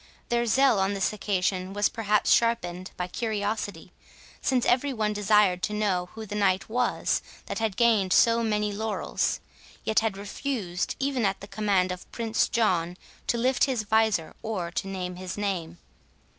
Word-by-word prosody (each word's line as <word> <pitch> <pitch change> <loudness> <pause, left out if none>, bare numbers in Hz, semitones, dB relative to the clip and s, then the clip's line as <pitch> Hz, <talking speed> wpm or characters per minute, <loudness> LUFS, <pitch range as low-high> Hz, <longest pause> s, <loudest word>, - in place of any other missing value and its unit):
Their 235 0 +1
zeal 265 -2 +4
on 195 +1 +1
this 195 +2 0
occasion 190 -2 -1
was 205 +1 +2
perhaps 210 -2 +2
sharpened 185 -6 +1
by 180 - -2
curiosity, 210 0 -3 0.5
since 255 -2 +1
every 265 +3 +2
one 215 -4 0
desired 205 -3 +3
to 210 - -1
know 190 -4 0
who 220 -1 -6
the 205 - -7
knight 195 -2 +1
was 245 +2 0 0.2
that - - -4
had 220 -4 -1
gained 220 -6 +3
so 230 +3 +5
many 210 -2 0
laurels, 220 +1 -1 0.4
yet 220 - +3
had 220 -3 -1
refused, 200 -3 -3
even 270 -3 0
at 195 -1 +1
the 200 - -10
command 195 -3 +1
of 180 0 -8
Prince 225 -1 0
John, 180 -6 +1 0.3
to 235 - +1
lift 255 +2 +3
his 255 -6 -1
visor 215 -6 +2
or 190 -7 -3
to 190 - -3
name 180 -2 -4
his 185 +1 -6
name. 180 -5 -2
210 Hz, 165 wpm, -27 LUFS, 185-225 Hz, 0.5 s, so